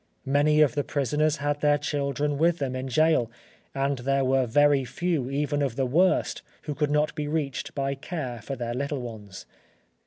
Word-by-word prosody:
Many 145 +3 +3
of 150 - +4
the 145 -1 0
prisoners 150 +3 0
had 145 0 -2
their 145 0 +4
children 145 0 -1
with 170 +1 +3
them 135 -4 -3
in 130 +1 -4
gaol, 155 -3 +2 0.5
and 135 0 0
there 135 +2 +1
were 130 -1 +2
very 145 +3 +4
few 135 +1 -2
even 145 +1 -1
of 135 -5 -1
the 135 0 0
worst 175 +9 +2 0.2
who 150 - -3
could 150 0 0
not 150 +1 +1
be 150 -1 -3
reached 145 -3 -3
by 140 -1 -1
care 135 -5 -5
for 135 +6 -5
their 120 -2 -4
little 140 +2 -2
ones. 105 -5 -9
140 Hz, 185 wpm, -26 LUFS, 130-150 Hz, 0.5 s, of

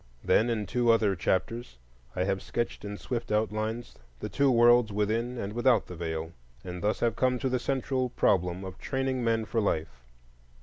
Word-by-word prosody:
Then, 115 - +3
in 110 -3 -1
two 120 0 +1
other 110 -4 +3
chapters 95 - -1 0.4
I 90 - +1
have 95 0 -1
sketched 120 -3 -3
in 100 0 -5
swift 120 0 -4
outline 110 +2 0 0.4
the - - -5
two 140 -1 +2
worlds 120 -2 +5
within 110 +4 -1
and 100 -2 -4
without 120 -2 +3
the 90 - -9
Veil, 80 -1 -4 0.3
and 90 -1 -6
thus 105 +1 0
have 115 -2 +2
come 125 +1 +2
to 130 +1 -1
the 125 0 0
central 130 0 -1
problem 90 -5 +1
of 95 0 -8
training 130 -1 -1
men 115 -1 +1
for 115 +1 0
life. 80 - -2
110 Hz, 180 wpm, -29 LUFS, 95-120 Hz, 0.4 s, worlds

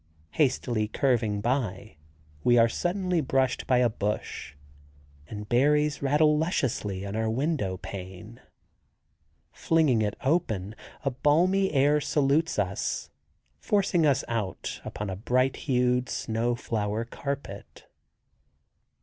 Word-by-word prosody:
Hastily 125 -6 +1
curving 110 -4 0
by, 110 - -2 0.5
we 120 0 +4
are 115 0 +6
suddenly 180 - -1
brushed 135 -2 0
by 130 - +4
a 125 0 +4
bush, 105 -7 -4 0.7
and 105 +2 -7
berries 150 +5 +2
rattle 150 +2 +3
lusciously 110 - -1
on 100 +1 -5
our 110 0 0
window 125 - -1
pane. 95 +4 -9 1.1
Flinging 155 -9 +2
it 105 -1 -1
open 110 - 0 0.3
a 135 - +1
balmy 175 +9 +2
air 145 +1 +3
salutes 145 +3 +1
us, 95 -2 -2 0.5
forcing 190 -6 +2
us 140 -4 +2
out 105 -6 -4
upon 105 -1 -5
a - - -3
bright 130 +6 +1
hued 125 0 +2
snow 115 +2 -1
flower 110 -1 -2
carpet. 120 -5 -7
125 Hz, 115 wpm, -27 LUFS, 105-145 Hz, 1.1 s, are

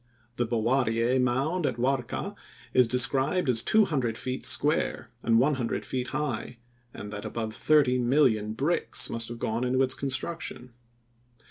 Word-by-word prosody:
The 120 - 0
Bowariyeh 120 +1 +1
mound 140 +7 0
at 125 - -2
Warka 125 0 -2 0.4
is 125 -2 +5
described 135 +7 +2
as 120 -3 +4
two 220 - +4
hundred 125 -10 -1
feet 130 0 -4
square 150 +3 +1
and 115 -1 +3
one 135 +6 +3
hundred 125 -4 -3
feet 125 -1 -3
high 130 -4 -3 0.3
and 105 -1 -8
that 105 - -6
above 110 -2 -4
thirty 140 0 +3
million 120 -5 +2
bricks 145 +9 -1
must 115 -1 -3
have 120 - -7
gone 115 +1 -2
into 130 +1 +2
its 130 0 0
construction. 130 -1 -4
125 Hz, 150 wpm, -27 LUFS, 115-135 Hz, 0.4 s, is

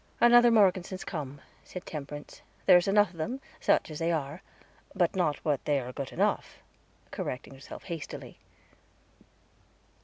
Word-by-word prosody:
"Another 240 0 +7
Morgeson's 190 -4 +3
come," 145 -5 -6 0.2
said 180 - -8
Temperance. 145 -1 -7 0.2
"There's 180 -1 +6
enough 205 -1 +4
of 175 - -16
them, 240 +12 -3 0.2
such - - +2
as 150 - -6
they 165 +1 +1
are 155 +1 -2 0.5
not 175 -3 +3
but 170 -6 +1
what 145 -4 +1
they 145 -2 +2
are 125 0 -6
good 140 0 -5
enough," - - 0 0.5
correcting 130 +2 -5
herself 135 0 -10
hastily. 170 -5 -7
165 Hz, 140 wpm, -29 LUFS, 145-190 Hz, 0.5 s, Another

